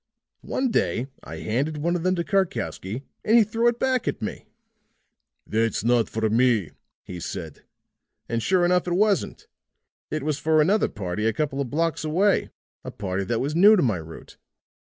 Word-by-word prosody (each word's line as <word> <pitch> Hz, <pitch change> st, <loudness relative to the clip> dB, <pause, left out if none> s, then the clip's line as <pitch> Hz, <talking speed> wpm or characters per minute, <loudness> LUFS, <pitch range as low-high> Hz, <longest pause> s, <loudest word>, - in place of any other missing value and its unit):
"One 260 Hz, -2 st, -1 dB
day 125 Hz, -, 0 dB, 0.2 s
I -, -, -8 dB
handed 140 Hz, +8 st, -2 dB
one 170 Hz, +4 st, 0 dB
of 175 Hz, -, -2 dB
them 185 Hz, +2 st, +1 dB
to 170 Hz, -, -1 dB
Karkowsky, 135 Hz, -, -2 dB, 0.2 s
and 225 Hz, +2 st, +4 dB
he 230 Hz, -, +7 dB
threw 225 Hz, +3 st, 0 dB
it 240 Hz, 0 st, +2 dB
back 255 Hz, -1 st, 0 dB
at -, -, -1 dB
me. -, -, -6 dB, 1.0 s
"'That's 110 Hz, -2 st, 0 dB
not 120 Hz, -1 st, +2 dB
for 110 Hz, 0 st, -1 dB
me,' 115 Hz, -5 st, +2 dB, 0.3 s
he 90 Hz, -, -8 dB
said. 80 Hz, -2 st, -7 dB, 0.7 s
And 115 Hz, 0 st, -1 dB
sure 180 Hz, +6 st, +2 dB
enough 180 Hz, 0 st, +2 dB
it 175 Hz, -, 0 dB
wasn't. 205 Hz, 0 st, +1 dB, 0.6 s
It 155 Hz, -2 st, -3 dB
was 150 Hz, -1 st, -1 dB
for 155 Hz, +1 st, +2 dB
another 195 Hz, +8 st, +3 dB
party 100 Hz, +1 st, -3 dB
a 115 Hz, -, +1 dB
couple 140 Hz, +2 st, -2 dB
of 135 Hz, -, -3 dB
blocks 165 Hz, +3 st, -1 dB
away 185 Hz, +6 st, +2 dB, 0.3 s
a -, -, -6 dB
party 95 Hz, -1 st, -3 dB
that 115 Hz, +4 st, -1 dB
was 145 Hz, +4 st, -2 dB
new 205 Hz, +5 st, +7 dB
to 180 Hz, -, +2 dB
my 110 Hz, -8 st, +1 dB
route. 80 Hz, 0 st, -11 dB
150 Hz, 180 wpm, -24 LUFS, 110-185 Hz, 1.0 s, he